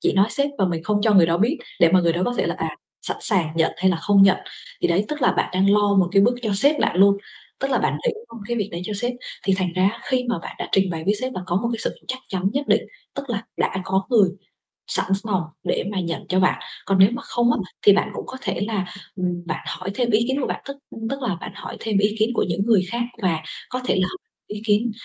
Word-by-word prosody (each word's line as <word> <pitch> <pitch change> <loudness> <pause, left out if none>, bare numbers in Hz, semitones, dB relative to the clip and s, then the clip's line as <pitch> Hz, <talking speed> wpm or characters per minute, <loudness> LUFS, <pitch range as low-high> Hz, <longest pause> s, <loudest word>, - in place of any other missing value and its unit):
chỉ - - +2
nói 195 0 +4
sếp 280 0 +2
và 195 - +3
mình 170 -3 -1
không 210 +1 0
cho 220 - +4
người 175 -4 +7
đó 165 0 +2
biết 235 - +1 0.2
để 170 - +7
mà 185 - +6
người 170 -1 +2
đó 175 +2 -1
có 245 - -1
thể - - +2
là, - - -1
à, - - -3 0.3
sẵn - - -1
sàng 185 -7 +1
nhận 165 -1 +2
hay 190 +2 +3
là 175 - +1
không 200 +4 +4
nhận. 195 -1 +6 0.5
Thì - - +3
đấy, 180 +4 +2
tức 300 -2 -4
là - - +4
bạn - - 0
đang 190 +2 +3
lo 205 0 +4
một 185 -2 +4
cái 195 0 +5
bước 240 +4 +4
cho 215 - 0
sếp 285 +9 +4
bạn - - +1
luôn. 200 +1 +6 0.4
Tức 270 - -1
là 260 - +3
bạn - - 0
nghĩ - - +4 0.2
thông 230 - -9
cái 240 - -1
việc 205 -2 -1
đấy 170 +1 -4
cho 210 - -4
sếp 245 +1 0 0.3
thì 195 0 +3
thành 185 -2 -1
ra 185 +1 0
á 230 - -11
khi 255 -1 0
mà 235 - 0
bạn - - -8
đã - - -4
trình 190 -1 +3
bày 160 -2 -4
với 205 - +2
sếp 255 0 -2
là - - -3
có 175 0 0
một 235 +4 0
cái 230 - -3
sự - - -1
chắc 255 - -2
chắn 190 0 0
nhất 280 +2 -2
định, - - +4 0.3
tức 275 -2 -5
là 220 -1 -2
đã - - 0
có 190 0 +1
người 210 -6 +5 0.6
sẵn 190 +1 +1 0.2
lòng 195 -5 0 0.2
để - - 0
mà 195 - -2
nhận 170 -2 -3
cho 185 - +2
bạn. 185 - +2 0.3
Còn 195 -1 +1
nếu 190 +1 +8
mà - - -5
không 240 0 +1
á, - - +1 0.3
thì 205 - +9
bạn 200 - +1
cũng - - -6
có 260 - -7
thể - - -2
là, 205 -4 -1 0.3
ừm, 180 -2 -3
bạn 155 -2 -4
hỏi 185 +2 -4
thêm 245 0 +1
ý 220 +2 +3
kiến 265 +2 0
của - - -1
bạn, - - -4
tức, 275 0 -7
ưm, 225 0 -6
tức 275 +2 -4
là 220 -8 -1
bạn - - -6
hỏi - - -7
thêm 215 -3 0
ý 205 +1 +2
kiến 220 - +3
của - - +1
những 175 +4 0
người 220 -5 +4
khác 235 - -1 0.2
và 170 -5 +1 0.3
có 255 - -3
thể - - +2
là 185 - +2
h - - -7 0.4
ý 210 - -6
kiến 215 +2 +2
200 Hz, 290 wpm, -22 LUFS, 185-235 Hz, 0.6 s, thì